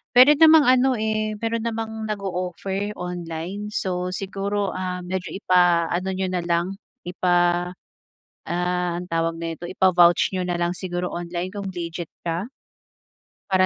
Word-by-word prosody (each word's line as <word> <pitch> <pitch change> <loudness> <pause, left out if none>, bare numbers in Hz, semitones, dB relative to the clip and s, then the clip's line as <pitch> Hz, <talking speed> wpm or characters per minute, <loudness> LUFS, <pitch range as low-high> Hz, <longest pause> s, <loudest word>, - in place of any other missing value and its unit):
Puwede 280 +4 +8
namang 320 -1 +8
ano, 255 0 +4
eh, 215 -1 -1
meron 230 0 -1
namang 220 -1 -4
nag-o-offer 195 0 -3
online, 180 +3 -5
so 180 -3 -2
siguro, 200 +1 -2
ah, 180 -1 -4
medyo 180 0 -3
ipaano 180 -2 +2
niyo 185 0 -2
na 180 - 0
lang, 170 +1 0 0.6
ah, 175 0 +2 0.7
anong 180 0 -1
tawag 165 0 0
nito 165 +1 -5
ipa-vouch 175 -1 +4
niyo 185 - -1
na 175 -1 -1
lang 175 0 0
siguro 180 -1 -4
online 175 +2 -4
kung 200 -2 -4
legit 170 -2 -5 0.2
ka. 175 +7 -2 1.0
Para 185 -1 +4
180 Hz, 130 wpm, -23 LUFS, 175-205 Hz, 1.0 s, Puwede